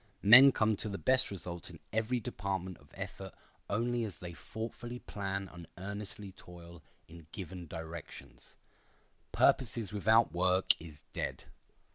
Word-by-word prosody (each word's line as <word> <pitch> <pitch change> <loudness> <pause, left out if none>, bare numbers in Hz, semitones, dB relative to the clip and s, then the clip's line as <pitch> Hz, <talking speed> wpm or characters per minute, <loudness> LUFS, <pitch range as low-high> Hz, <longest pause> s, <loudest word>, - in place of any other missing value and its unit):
Men 130 +7 +10
come 110 -3 +2
to 110 - +2
the 100 - -4
best 130 +3 +3
results 90 -4 -2
in - - -11
every 110 +3 0
department 95 -3 -4
of 70 - -21
effort - - -7 0.3
only 120 +3 0
as 105 -5 -5
they 90 -1 -8
thoughtfully 115 - -7
plan 100 -4 -4
and 85 -2 -10
earnestly 100 +1 -6
toil 85 -2 -13 0.3
in 85 -1 -13
given 90 -2 -7
directions. 80 0 -9 0.7
Purposes 115 -5 +2
without 110 -2 +4
work 90 +1 +4
is 80 -3 -12
dead. - - -4
95 Hz, 135 wpm, -32 LUFS, 85-110 Hz, 0.7 s, Men